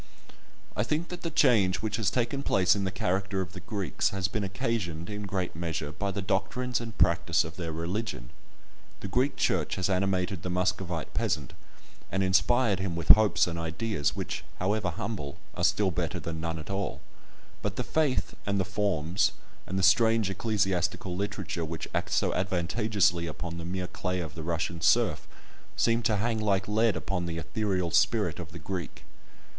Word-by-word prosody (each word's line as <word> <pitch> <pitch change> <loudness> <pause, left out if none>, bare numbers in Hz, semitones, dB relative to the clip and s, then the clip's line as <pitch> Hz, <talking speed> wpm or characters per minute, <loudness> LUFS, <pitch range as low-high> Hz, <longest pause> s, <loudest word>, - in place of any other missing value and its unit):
I - - +1
think 155 +9 -1
that 180 -1 -6
the 165 - -2
change 110 - +3
which 110 -1 -1
has 110 -5 +2
taken 125 +5 0
place 95 -8 +3
in 100 -1 -1
the 95 - -1
character 95 +1 -1
of 95 -1 -3
the 95 - -7
Greeks 100 - -1
has 95 -1 -1
been 105 +1 -2
occasioned, 95 -3 -2
in 105 0 -4
great 95 -4 -2
measure, 80 -3 -3
by 100 +6 -2
the 100 0 -3
doctrines 120 +7 0
and 115 -2 -7
practice 85 -1 +3
of 80 0 -8
their 85 -2 -4
religion. 85 - -3 0.7
The - - -4
Greek 125 +8 +1
Church - - +1
has 95 +1 0
animated 95 -1 0
the 90 - -4
Muscovite 90 -2 -1
peasant, 85 - -1 0.6
and 95 +1 +1
inspired 100 +3 +3
him 95 -3 -2
with 85 -2 -5
hopes 110 -1 +7
and 85 -1 -4
ideas 80 -1 -1
which, - - -4
however 100 0 0
humble, 80 -4 -4 0.2
are - - -4
still - - +3
better - - -2
than 80 -1 -5
none 80 0 -2
at 80 +5 -7
all; 100 -3 -2 0.6
but - - -2
the - - -1
faith, 150 -5 +1
and 100 -1 +1
the 95 - +1
forms, 95 -3 +1 0.3
and 95 - -2
the 95 - 0
strange 110 +1 +5
ecclesiastical 95 -3 0
literature 100 -3 -3
which 80 0 -4
act - - -1
so - - +2
advantageously 95 0 +1
upon 85 +2 -5
the 85 - -6
mere 90 +1 -2
clay 90 0 -3
of 80 -3 -5
the 80 - -6
Russian 85 +1 -2
serf, - - +3 0.5
seem 115 0 +3
to 110 -2 +2
hang 110 +2 0
like 100 -3 +1
lead 110 0 +3
upon 90 +1 -2
the 85 -1 -3
ethereal 95 -1 -1
spirit 100 -3 +2
of 85 -3 -7
the 85 - -8
Greek. 85 0 -5
95 Hz, 180 wpm, -29 LUFS, 85-105 Hz, 0.7 s, hopes